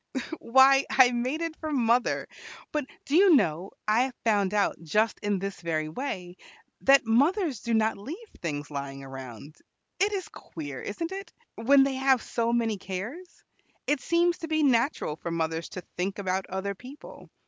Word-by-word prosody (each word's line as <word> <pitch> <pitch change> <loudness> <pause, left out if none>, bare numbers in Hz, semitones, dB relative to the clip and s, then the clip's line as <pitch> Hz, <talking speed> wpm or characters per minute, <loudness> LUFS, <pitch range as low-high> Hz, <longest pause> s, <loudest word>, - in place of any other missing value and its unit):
"Why, 265 +3 +6
I 255 -2 +6
made 250 +6 -1
it 330 -1 -3
for 310 -1 -5
mother; 240 -3 +2 0.5
but, 300 -3 -2 0.2
do 285 - -1
you 370 -1 +7
know, 180 - +1 0.2
I 215 +3 +4
have 260 -2 -7
found 205 -4 +2
out 205 -4 0
just 210 +8 +1
in 205 -1 0
this 195 +1 -5
very 155 -2 -2
way 180 - -5 0.4
that 275 -2 +5
mothers 285 - +2
do 230 +1 -1
not 220 -1 +1
leave 280 - -6 0.2
things 150 -3 -4
lying 140 -1 -5
around. 135 +2 -9 0.4
It 405 +2 +3
is 385 -3 -3
queer, 145 -5 -8
isn't 330 - -4
it, 390 +1 -7 0.2
when 270 +4 +5
they 275 0 0
have 265 -2 +3
so 235 -1 -1
many 225 -3 0
cares? 220 - -7 0.4
It 290 -3 +1
seems 340 +4 +2
to 325 - -5
be 310 -1 +1
natural 240 - +1
for 170 - -5
mothers 165 0 -2
to 185 - -7
think 190 +3 -2
about 190 -1 -2
other 190 +1 -3
people. 255 +8 -12
230 Hz, 170 wpm, -27 LUFS, 180-275 Hz, 0.5 s, you